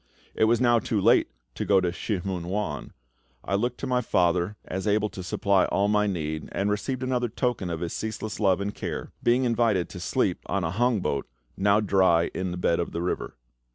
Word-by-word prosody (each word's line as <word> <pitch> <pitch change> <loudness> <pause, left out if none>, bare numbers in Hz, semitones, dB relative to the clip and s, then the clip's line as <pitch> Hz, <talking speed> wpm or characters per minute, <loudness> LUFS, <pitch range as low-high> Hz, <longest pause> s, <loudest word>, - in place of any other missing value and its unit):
It - - +3
was 115 +1 +3
now 120 -2 +4
too 110 -2 -1
late - - +4 0.2
to - - -3
go 100 - +2
on 95 - +3
to 90 - +1
Shih 95 +2 -3
mun 90 -3 -3
wan. 95 -6 -3 0.5
I - - -3
looked 120 +5 0
to - - -2
my 125 -1 +1
FATHER 90 -1 +1
as 95 +3 -4
able 105 +1 +2
to 95 - -8
supply 95 +1 +2
all 100 +1 +1
my 105 0 +3
need, 80 -5 -3
and 100 +1 0
received 130 +5 -2
another 125 -2 0
token 115 -5 -1
of 85 -1 -4
His 85 - -3
ceaseless 110 -1 -4
love 95 -4 +3
and 100 +1 -2
care, - - -5
being 120 +2 +3
invited 115 -7 +1
to - - -8
sleep - - 0
on 100 0 -1
a 80 - -1
hong 115 +1 +1
boat, 70 -5 -2 0.3
now 100 +2 +3
dry 95 -4 +3
in 95 0 -2
the 90 - -4
bed 85 -1 +1
of 85 - -3
the 85 - -2
river. 90 - -3
100 Hz, 220 wpm, -26 LUFS, 90-110 Hz, 0.5 s, now